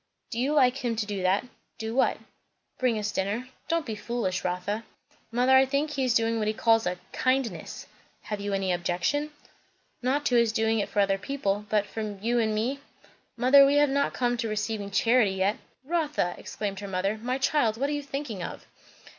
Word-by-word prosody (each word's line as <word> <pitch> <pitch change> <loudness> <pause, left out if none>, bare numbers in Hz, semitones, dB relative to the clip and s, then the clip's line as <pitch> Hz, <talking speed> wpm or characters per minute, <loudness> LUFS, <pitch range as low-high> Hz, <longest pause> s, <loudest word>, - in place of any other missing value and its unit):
"Do 230 - -3
you 270 +4 +1
like 255 -2 +4
him 240 -4 -1
to 220 -1 -1
do 205 -2 -4
that?" 185 +5 +2 0.3
"Do 220 0 -4
what?" 265 - +2 0.6
"Bring 250 -3 +2
us 210 -1 -2
dinner." 210 +7 -2 0.2
"Don't 335 -1 0
be 225 - -4
foolish, 210 -4 -2
Rotha." 185 +5 -2 0.5
"Mother, 250 +3 +4
I 265 0 +6
think 285 +3 0
he 275 -2 -1
is 250 -2 +2
doing 230 0 +2
what 215 - 0
he 215 - 0
calls 225 -2 +3
a 180 0 -1
'kindness.'" 255 -10 -1 0.4
"Have 210 -1 -4
you 205 0 -3
any 195 -1 0
objection?" 180 +12 -1 0.7
"Not 275 +4 0
to 250 - +2
his 235 -2 +4
doing 220 0 +1
it 205 - -2
for 205 - +2
other 195 -1 +2
people; 210 -5 -2
but 210 -1 +2
for 210 -1 -5
you 235 +4 +1
and 220 -2 +1
me 245 +6 -1 0.6
Mother, 270 +3 +7
we 275 +1 +4
have 290 -1 +4
not 280 +1 +1
come 245 -1 0
to 230 -1 -2
receiving 210 -1 -2
charity 225 -1 +3
yet." 195 +3 +1 0.3
"Rotha!" 300 - 0
exclaimed 200 -2 -5
her 205 - -6
mother. 195 +3 -1
"My 250 +2 -1
child, 260 -5 +1
what 275 +3 0
are - - 0
you 290 - -2
thinking 275 -8 -5
of?" - - -6
225 Hz, 200 wpm, -27 LUFS, 205-260 Hz, 0.7 s, Mother